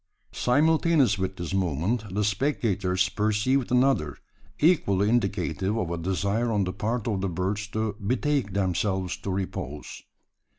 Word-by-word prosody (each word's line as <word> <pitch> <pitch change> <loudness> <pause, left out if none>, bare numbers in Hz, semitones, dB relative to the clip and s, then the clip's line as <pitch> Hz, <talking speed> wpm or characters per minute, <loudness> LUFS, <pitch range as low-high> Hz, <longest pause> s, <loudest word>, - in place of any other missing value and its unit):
Simultaneous 150 -4 +3
with 95 0 -2
this 90 -1 -5
movement, 95 - -1
the 105 - +1
spectators 100 -5 +1
perceived 110 +6 0
another 125 - +2 0.4
equally 105 - +3
indicative 100 -3 0
of 90 -7 -2
a 85 - -2
desire 100 +6 0
on 105 -3 +1
the 95 0 -3
part 115 +2 -2
of 100 -4 -1
the 95 - -1
birds 95 +5 -2
to 110 -1 -2
betake 130 +1 0
themselves 95 -1 0
to - - -6
repose. 90 -6 -4
100 Hz, 135 wpm, -26 LUFS, 95-120 Hz, 0.4 s, Simultaneous